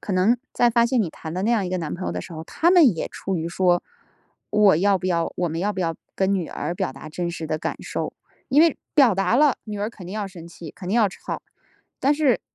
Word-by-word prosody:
可 205 - -4
能 190 +6 +3 0.2
在 240 - +4
发 235 0 +3
现 235 +1 +2
你 195 - 0
谈 160 0 -8
的 185 +2 -2
那 225 - +2
样 225 -5 +2
一 180 - -4
个 185 - -1
男 160 -3 -4
朋 - - -6
友 85 - -2
的 90 - -3
时 90 - -10
候， 160 -1 -6
他 335 - +2
们 315 - +6
也 - - -2
出 190 -2 -4
于 165 0 -2
说 175 0 +2 0.7
我 210 -5 +5
要 195 +3 +3
不 185 - -4
要 170 -2 0
我 175 - 0
们 165 +1 -3
要 205 +3 0
不 190 - -8
要 165 -2 0 0.2
跟 195 +1 +2
女 180 -5 -2
儿 170 +4 -4
表 130 - -2
达 135 +3 -10
真 170 +3 -3
实 165 -2 -5
的 155 - -1
感 155 - -3
受？ - - -4 0.4
因 280 +3 +5
为 330 -2 +5 0.2
表 265 -8 +6
达 195 +4 +2
了 290 -1 +4
女 210 -2 -5
儿 205 +1 -1
肯 215 -5 -12
定 180 - -7
要 210 -1 -3
生 180 -4 -11
气， 165 -2 -10
肯 180 - -9
定 205 - +1
要 220 -4 +4
吵。 190 - -6 0.6
但 275 - +4
是 290 -5 +2
190 Hz, 290 characters per minute, -23 LUFS, 170-230 Hz, 0.7 s, 们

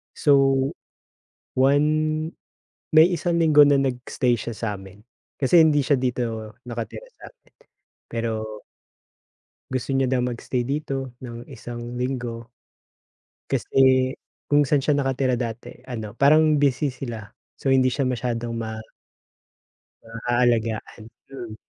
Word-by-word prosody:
So, 135 -2 +3 0.8
one 140 +3 +4 1.1
may 160 +3 +7
isang 175 0 0
linggo 150 -2 +7
na 145 0 +4
nag-stay 125 -1 0
siya 115 +2 -5
sa'min 100 -2 -6 0.3
kasi 145 +5 +4
hindi 155 -3 +5
siya 140 0 +2
dito 115 -4 -3
nakatira 120 - -6 0.2
sa'min. - - -16 0.5
Pero 110 -2 -4 1.1
Gusto 130 +1 -2
niya 135 - +2
daw 130 -1 +1
mag-stay 125 0 -2
dito 135 -1 -4
ng 120 +3 -9
isang 120 -1 -7
linggo. 120 -2 -3 1.1
Kasi 130 -1 +3 0.4
kung 145 0 +4
saan 145 -1 +2
siya 145 +1 +1
nakatira 130 -2 0
dati 120 0 -6
ano, 115 -3 -7
parang 155 +2 +5
busy 140 0 +2
sila 115 -5 -7 0.3
so, 135 - -2
hindi 130 -1 +4
siya 140 - 0
masyadong 120 -1 -2
ma 110 -1 -4 1.3
maalagaan, 115 -1 -1 0.3
mm. 120 -5 -7
125 Hz, 115 wpm, -23 LUFS, 115-140 Hz, 1.3 s, may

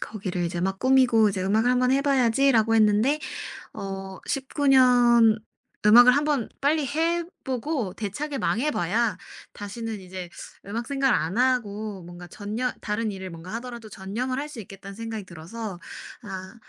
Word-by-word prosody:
거기를 185 -4 -4
이제 170 0 -3
막 190 +1 -1
꾸미고 255 -4 +4
'이제 190 -1 -3
음악을 220 +5 +2
한번 250 +1 +3
해 275 - +2
봐야지.'라고 250 -4 +3
했는데 220 +7 +3 0.5
어 195 -1 -6
19 275 +1 -1
년 240 -4 +6 0.5
음악을 245 +4 +9
한번 290 -5 0
빨리 295 +1 +2
해 330 +4 0 0.2
보고 260 - -2
대차게 270 +9 -4
망해봐야 225 - 0 0.3
다시는 215 +1 -6
이제 185 -1 -8 0.4
음악 230 +4 -4
생각을 275 -1 +2
안 170 +6 -1
하고 215 -6 0
뭔가 175 +1 -10
전녀 215 +7 -3
다른 210 +1 -2
일을 190 -1 -7
뭔가 170 +3 -9
하더라도 235 -1 -7
전념을 215 +7 -3
할 295 - -5
수 250 -7 -8
있겠다는 195 0 -11
생각이 225 -2 -5
들어서 185 +4 -7 0.4
아 190 -1 -8
225 Hz, 315 characters per minute, -25 LUFS, 195-255 Hz, 0.5 s, 음악을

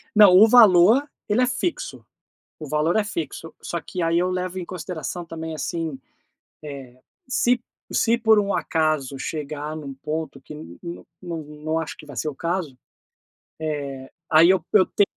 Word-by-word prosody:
Não, 210 -3 +9
o 220 - +9
valor, 225 +3 +6 0.2
ele 215 +3 +2
é 250 - +3
fixo. 330 +7 -3 0.5
O 155 - -7
valor 155 +4 +1
é 215 - +2
fixo, 165 -4 -5
só 170 - -3
que 175 +4 -5
aí 165 +1 +2
eu 180 - +1
levo 185 0 -3
em 180 - -4
consideração 175 -1 -5
também, 160 -1 -6
assim, 155 -1 -3 0.7
eh, 135 -4 -9 0.3
se 250 -1 +2
p 240 - -33 0.3
se 230 +1 +3
por 220 -2 +5
um 200 -1 0
acaso 155 -4 0
chegar 150 +1 -4
num 145 -3 -7
ponto 155 +4 -5
que, - - -11
n 85 - -11
n 170 0 -8 0.2
não 155 -2 -4
acho 160 - -5
que - - -12
vai 145 -2 -11
ser 125 +7 -2
o 145 - -8
caso, 165 -4 -3 0.8
eh, 140 -4 -4 0.2
aí 160 +2 +7
eu 185 -4 +2
eu 195 -3 +6
te 205 - +3
165 Hz, 175 wpm, -23 LUFS, 150-185 Hz, 0.8 s, Não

